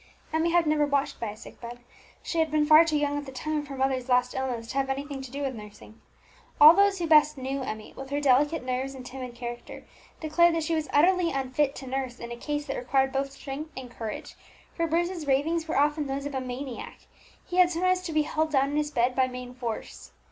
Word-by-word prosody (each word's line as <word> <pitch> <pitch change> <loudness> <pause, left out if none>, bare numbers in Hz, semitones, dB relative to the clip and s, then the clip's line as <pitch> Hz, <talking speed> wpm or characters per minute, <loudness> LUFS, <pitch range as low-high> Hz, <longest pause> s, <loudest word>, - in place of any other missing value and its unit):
Emmie 320 +1 +2
had 340 0 +3
never 300 -1 +2
before 285 0 +3
watched - - -10
by 230 - -3
a 210 - -9
sick - - -13
bed; 240 0 -7 0.5
she 335 - -2
had 320 -1 +2
been 300 0 +2
far 310 +2 +8
too 315 -2 0
young 290 0 0
at 290 - -9
the - - -7
time 305 +4 -3
of 295 - -7
her 275 -1 -7
mother's 265 -1 0
last 250 0 +3
illness 250 -3 -3
to 260 +4 -6
have 270 - 0
had 270 0 -1
anything 280 -1 -6
to 265 - -8
do 280 +3 -5
with 270 -1 -2
nursing. 210 0 -12 0.6
All 305 +2 +11
those 400 +1 +3
who 345 - -2
best 305 -2 +5
knew 270 +1 -3
Emmie, 215 -4 -6
with 270 0 -8
her 285 +1 -1
delicate 290 +2 +3
nerves 260 +2 -2
and 255 -1 -9
timid 250 -1 -7
character, 240 0 -8 0.3
declared 330 +2 +3
that 325 - 0
she 330 - -1
was 315 -2 -1
utterly 350 +3 +4
unfit 275 +1 0
to 270 - -8
nurse 260 -1 -3
in 235 0 -7
a - - -4
case 295 +4 -3
that 275 - -4
required 265 +2 +1
both 275 0 -1
strength 275 +3 -7
and 255 -2 -7
courage; 225 -3 -6 0.4
for 335 -1 -1
Bruce's 340 -1 -1
ravings 320 +5 +1
were 320 - -1
often 295 +1 +2
those 275 +1 -3
of 285 - -4
a 265 - -2
maniac. 255 0 -7 0.4
He 360 - -5
had 365 -1 +6
sometimes 365 +2 +1
to 360 - -5
be 310 -1 +2
held 315 +1 -1
down 275 0 +2
in 295 - -1
his 300 -1 0
bed 250 -2 +1
by 260 -1 +3
main 250 -1 -8
force. 240 -3 -6
275 Hz, 245 wpm, -27 LUFS, 255-310 Hz, 0.6 s, All